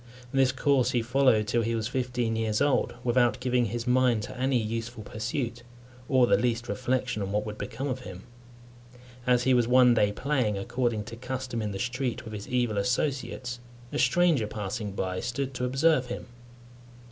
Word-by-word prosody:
This 135 -1 +3
course 130 -1 +2
he 120 - +1
followed 120 -3 +3
till 120 - +1
he 115 +1 -1
was 110 -1 -1
fifteen 125 -3 -1
years 110 -1 0
old, 145 -3 +1
without 120 -2 +2
giving 125 -1 +1
his 115 +2 -3
mind 125 -3 +3
to - - -7
any 130 +1 +1
useful 115 0 -3
pursuit, 115 +2 -3 0.5
or 130 -2 +5
the - - +3
least 120 -1 0
reflection 110 +1 -1
on 100 0 -3
what 105 +1 0
would 105 0 -6
become 135 - -4
of 130 -1 -2
him. 95 -6 -9 1.0
As 125 -1 +4
he 130 +1 +3
was 120 -2 +3
one 125 0 +6
day 105 -3 +3
playing, 125 -3 0
according 120 +1 -1
to 115 +2 -9
custom, 125 -1 -4
in 105 - -2
the 95 - -4
street, 125 +3 -2
with 110 - -8
his 105 -1 -6
evil 120 -4 0
associates, 125 +1 -2 0.3
a - - -1
stranger 150 -3 +3
passing 105 0 -4
by 95 -1 -2
stood 130 +4 -3
to 125 0 -2
observe 135 +1 +2
him. - - -5
120 Hz, 180 wpm, -28 LUFS, 110-130 Hz, 1.0 s, one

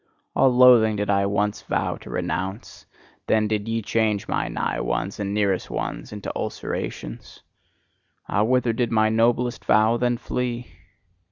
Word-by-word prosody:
All 135 - +5
loathing 125 -3 +6
did 105 0 -1
I 100 0 +2
once 105 +1 -1
vow - - -1
to - - -13
renounce: 95 +4 -4 0.4
then 110 -1 +2
did 105 0 -2
ye 115 0 -1
change 110 -2 0
my - - -1
nigh - - -2
ones 90 +13 -2
and 100 -1 -2
nearest 100 -3 0
ones - - -4
into 105 -1 -6
ulcerations. - - -5 0.8
Ah, 100 - +1
whither 125 +1 +2
did 120 0 -1
my 110 -1 +3
noblest 120 +2 +1
vow 110 +2 +3
then 120 0 +1
flee? 125 0 -4
110 Hz, 150 wpm, -23 LUFS, 100-120 Hz, 0.8 s, loathing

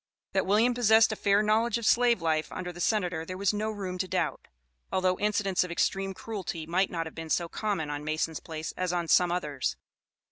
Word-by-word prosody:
That 190 -1 +1
William 220 +5 +4
possessed 225 -2 +5
a - - -2
fair 205 0 +2
knowledge 220 +2 +2
of 235 - -5
slave 235 -5 +3
life 155 -1 0
under 180 -1 -5
the 175 - -8
Senator 180 -7 0
there 185 +3 -6
was 200 +2 +1
no 215 +1 -1
room 190 -4 -5
to 185 - -1
doubt, - - -2 0.4
although 185 -1 +1
incidents 205 -3 +1
of 180 - -6
extreme 195 +2 -1
cruelty 185 -8 -5
might 180 +4 +1
not 165 -1 -3
have 160 - -8
been 160 -1 -7
so 170 +1 +1
common 180 -6 -2
on 145 0 -4
Mason's 155 +1 -2
place 160 -1 -6
as 185 -1 -1
on 175 -1 -1
some 175 +1 +4
others. 150 -7 -2
185 Hz, 210 wpm, -28 LUFS, 165-210 Hz, 0.4 s, possessed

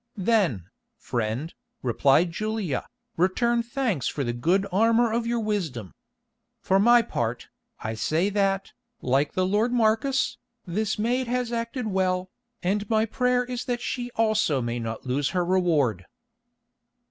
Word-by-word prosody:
"Then, 185 - +1 0.3
friend," 120 +6 -3 0.3
replied 135 +7 +3
Julia, 215 - -2 0.3
"return 235 +7 +2
thanks 235 - -1
for 145 - -2
the 120 -2 -2
good 175 +11 +1
armour 225 +3 +3
of 230 0 0
your 235 0 0
wisdom. 170 - -3 0.7
For 190 -3 +2
my 240 +3 +6
part, 120 - -3 0.3
I 110 - -3
say 160 - 0
that, 195 -1 0 0.3
like 135 +3 +1
the 185 - +1
lord 210 +5 +1
Marcus, 245 +3 +1 0.3
this 205 +4 -1
maid 245 +4 0
has 245 -1 -1
acted 230 +1 -3
well, 185 -2 0 0.3
and 205 +3 0
my 220 -1 +3
prayer 250 +2 +1
is 245 -1 -4
that 245 -1 -1
she 245 -1 -3
also 215 -10 +2
may 120 0 -2
not 115 +1 -5
lose 135 +2 0
her 175 - +2
reward." 155 - +1
195 Hz, 140 wpm, -25 LUFS, 145-230 Hz, 0.7 s, my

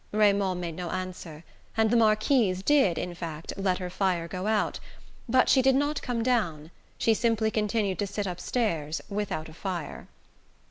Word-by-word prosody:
Raymond 200 -3 +2
made 170 -2 -4
no 175 0 -4
answer, 185 -4 -6 0.3
and 220 -1 +3
the - - +3
Marquise 215 -3 +3
did, 270 - +4
in 180 - -3
fact, 165 -2 -6
let 195 -2 0
her 180 -2 -5
fire 180 -3 0
go 185 +3 -4
out. 215 -1 0 0.5
But 255 +2 +4
she 265 - +5
did 265 0 +4
not 290 +2 0
come 240 -3 -2
down 170 -11 0 0.3
she 225 - +3
simply 220 -1 +1
continued 210 -3 0
to 205 - 0
sit 205 +1 -3
upstairs 175 -4 -2
without 200 -6 -3
a 160 - -12
fire. 175 -3 -5
200 Hz, 170 wpm, -27 LUFS, 175-225 Hz, 0.5 s, she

